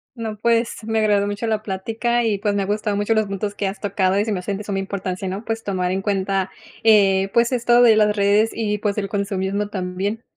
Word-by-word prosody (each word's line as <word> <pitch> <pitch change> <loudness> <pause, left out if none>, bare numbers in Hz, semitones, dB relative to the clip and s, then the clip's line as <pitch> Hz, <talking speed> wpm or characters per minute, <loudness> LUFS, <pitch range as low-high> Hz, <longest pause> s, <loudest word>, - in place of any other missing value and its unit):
No, 220 -3 -5
pues, 230 0 0
me 225 0 0
agradó 205 -2 +2
mucho 205 +3 -3
la 215 -1 -1
plática 225 +5 -1
y, 215 -3 +1
pues, 205 0 -1
me 200 - 0
ha - - -1
gustado 210 0 -1
mucho 205 +2 +1
los 220 0 +2
puntos 200 +1 -4
que 200 - -1
has 195 +1 -5
tocado 195 -1 +1
y 205 - +1
se 220 - -2
me 195 - -1
hacen 195 +2 -3
de 210 - -7
suma 200 -1 -3
importancia, 195 -1 -4
¿no?, 190 +3 -4
pues 225 0 -3
tomar 185 -2 -1
en 190 +1 -2
cuenta, 195 -1 -1 0.3
eh, 195 -3 +4
pues, 235 +1 +3
esto 240 -1 +3
de 230 -3 +7
las 210 -1 +3
redes 205 +2 +3
y, 210 -2 -1
pues, 205 0 -1
el 195 -1 -3
consumismo 200 0 -2
también. 195 +3 -3
205 Hz, 235 wpm, -21 LUFS, 195-220 Hz, 0.3 s, de